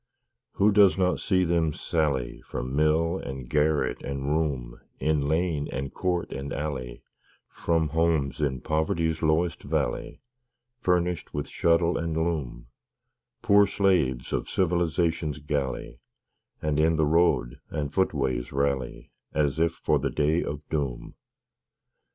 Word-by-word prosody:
Who 105 +2 +3
does 100 -4 +5
not 90 -1 +1
see 95 -2 +2
them 85 -3 +1
sally 70 -8 -1
From 65 +1 -5
mill, 80 +4 +2
and 65 -2 -7
garret, 75 +2 +1
and 70 0 -4
room, 70 -7 -1 0.2
In 75 -2 +1
lane, 80 -2 0
and 70 0 -4
court 90 -2 -1
and 70 +1 -5
alley, 70 -5 -4 0.5
From 80 -2 0
homes 80 -2 +1
in 65 -4 -1
poverty's 80 +1 0
lowest 80 +2 +1
valley, - - -2 0.6
Furnished 90 - 0
with 75 - -2
shuttle 85 +1 +2
and 80 -1 -2
loom 80 -8 -2 0.8
Poor 100 0 +6
slaves 90 -11 +1
of - - -2
Civilization's 85 -3 0
galley 70 -5 -3 0.6
And 75 -1 0
in 80 +1 +3
the 80 -1 +2
road 75 -7 +2
and 70 -1 -3
footways 70 -9 0
rally, 70 -2 -2 0.2
As 75 -1 +1
if 85 0 +2
for - - +1
the - - -1
Day 80 +3 +1
of 75 +1 -6
Doom? 70 -6 -3
80 Hz, 130 wpm, -26 LUFS, 70-85 Hz, 0.8 s, Poor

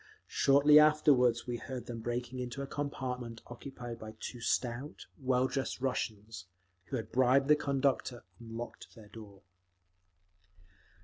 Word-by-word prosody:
Shortly 145 +2 +6
afterward 150 -6 +5
we 120 -1 -3
heard 130 +1 -6
them 120 -1 -6
breaking 120 +2 -3
into 125 +2 -4
a - - -3
compartment 125 -5 -4
occupied 120 -1 -8
by 110 0 -9
two 120 - -6
stout, 125 +4 -2
well 130 -1 +2
dressed 130 -1 -2
Russians, 110 -6 -3 0.4
who 135 - -4
had 115 - -4
bribed 130 +3 +3
the 150 - +8
conductor 135 -3 0 0.2
and 115 -1 -11
locked 120 - -8
their 110 -3 -14
door…. 105 -3 -12
125 Hz, 135 wpm, -32 LUFS, 115-135 Hz, 0.4 s, the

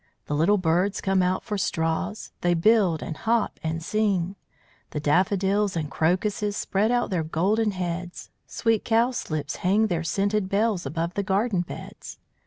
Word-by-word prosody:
The - - -4
little 170 +8 +3
birds 185 +3 +1
come 195 -1 +1
out 180 +1 0
for 210 -3 -3
straws; 170 +4 -2
They 175 0 +2
build, 185 -3 +3
and 160 - -5
hop, 230 +4 0
and 160 +1 -3
sing. 195 -2 0 0.5
The 150 - -4
daffodils 190 +5 +1
and 155 -3 -3
crocuses 205 +5 0
Spread 205 +3 +1
out 245 -3 +1
their 175 -3 0
golden 195 +8 +1
heads; 180 -2 -5 0.2
Sweet 225 -2 0
cowslips 225 - 0
hang 205 +3 +2
their 175 -5 -1
scented 200 +3 0
bells 200 -5 +1
Above 165 +4 -2
the 200 - -1
garden 200 0 +1
beds. 175 - -9
190 Hz, 155 wpm, -25 LUFS, 170-210 Hz, 0.5 s, little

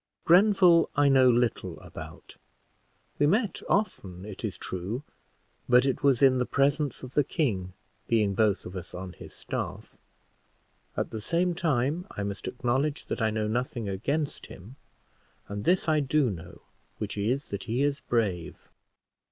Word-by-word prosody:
Grenville, 180 -2 +6
I 145 0 +4
know 130 -2 +6
little 120 -1 0
about; - - -11 0.8
we 145 - +4
met 210 +5 +1
often, 95 - -1
it 105 0 -9
is 100 -6 -3
true, 95 +9 -4 0.7
but 125 +1 +6
it 135 - 0
was 140 -3 +3
in 130 -1 +6
the 125 - +1
presence 140 0 +1
of 130 0 -8
the 145 - +3
king, 100 - -1 0.3
being 105 -4 +2
both 105 -1 +1
of 90 - -8
us 90 -1 -7
on 90 0 -6
his - - -12
staff; - - -5 1.0
at - - -1
the 110 - -5
same 175 +8 +1
time, 160 +1 0
I 100 - -5
must 100 0 -5
acknowledge 135 +4 -1
that - - -2
I 110 - +3
know 110 0 -1
nothing 120 0 -2
against 140 +10 -2
him; 105 +8 -12 0.7
and 100 0 -5
this 180 0 +2
I 155 -1 +3
do 140 -3 +2
know, 85 -2 -9 0.4
which - - -4
is, 120 +8 -1
that 100 -1 -5
he 120 +4 0
is 145 -1 +1
brave." 100 -8 -1
125 Hz, 160 wpm, -28 LUFS, 105-145 Hz, 1.0 s, Grenville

